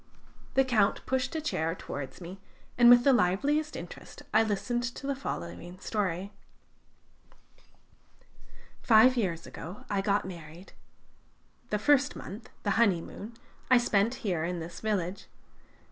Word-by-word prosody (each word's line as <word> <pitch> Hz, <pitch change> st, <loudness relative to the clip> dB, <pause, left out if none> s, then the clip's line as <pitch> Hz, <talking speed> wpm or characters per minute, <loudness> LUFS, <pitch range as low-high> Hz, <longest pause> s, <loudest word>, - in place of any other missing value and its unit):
The 270 Hz, -, +5 dB
Count 215 Hz, -6 st, +2 dB
pushed 260 Hz, +2 st, -1 dB
a 315 Hz, -, -1 dB
chair 165 Hz, -, -1 dB
towards 140 Hz, -3 st, -7 dB
me, 180 Hz, +3 st, -8 dB, 0.4 s
and 240 Hz, 0 st, +7 dB
with 245 Hz, 0 st, +8 dB
the 275 Hz, -, +5 dB
liveliest 280 Hz, +10 st, +1 dB
interest -, -, -9 dB
I -, -, +6 dB
listened 225 Hz, +3 st, -1 dB
to -, -, -8 dB
the 280 Hz, -, 0 dB
following 175 Hz, -, -6 dB
story: 195 Hz, -1 st, -2 dB, 2.5 s
"Five 235 Hz, +3 st, +6 dB
years 185 Hz, -9 st, -1 dB
ago 180 Hz, +5 st, -9 dB
I 200 Hz, -1 st, +1 dB
got 200 Hz, -1 st, +1 dB
married. 170 Hz, 0 st, -10 dB, 1.0 s
The 210 Hz, -, +1 dB
first 280 Hz, +4 st, +3 dB
month 210 Hz, +4 st, -9 dB
the 205 Hz, -, +1 dB
honeymoon 205 Hz, +2 st, 0 dB, 0.3 s
I 255 Hz, -, +7 dB
spent 230 Hz, 0 st, +2 dB
here, 175 Hz, -6 st, 0 dB
in 175 Hz, +1 st, -2 dB
this 165 Hz, +1 st, -7 dB
village. 200 Hz, -3 st, -2 dB
205 Hz, 130 wpm, -29 LUFS, 180-245 Hz, 2.5 s, with